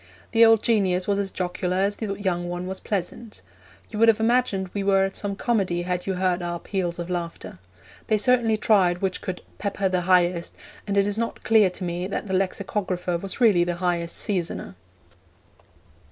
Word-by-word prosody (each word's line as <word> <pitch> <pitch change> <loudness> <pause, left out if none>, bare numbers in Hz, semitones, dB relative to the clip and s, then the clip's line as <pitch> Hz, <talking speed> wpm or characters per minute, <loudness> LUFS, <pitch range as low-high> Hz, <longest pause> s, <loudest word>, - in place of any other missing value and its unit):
The 230 0 +5
old 225 -1 +6
genius 190 -5 +2
was 200 -1 +1
as 200 -1 -1
jocular 180 0 -2
as 200 +2 +1
the 205 -3 -3
young 175 -3 -1
one 175 +1 -4
was 190 +1 -5
pleasant. 205 +3 -5 0.5
You 215 - -4
would 230 - +5
have 225 -1 +5
imagined 220 -5 +1
we 200 - -2
were 195 -1 +3
at 195 - -5
some 200 -1 -3
comedy 195 -7 0
had 180 +1 -3
you 190 - 0
heard 180 -1 0
our 175 0 -3
peals 180 -3 -3
of 170 -1 -5
laughter. 170 - -5 0.5
They 215 - +3
certainly 230 0 +2
tried 190 -4 +2
which 190 -1 -1
could 185 -1 -5 0.2
'pepper 200 -1 -1
the 185 -1 0
highest,' 175 -1 +2 0.3
and 200 0 -1
it 200 - +4
is 205 +2 -2
not 230 - -3
clear 220 -4 +5
to 180 +1 -7
me 175 +1 -3
that 200 - -4
the 190 - -4
lexicographer 185 -1 -1
was 195 +1 -5
really 210 -8 +5
the 175 0 -2
highest 170 -1 -2
seasoner. 180 - -2
190 Hz, 190 wpm, -24 LUFS, 180-205 Hz, 0.5 s, old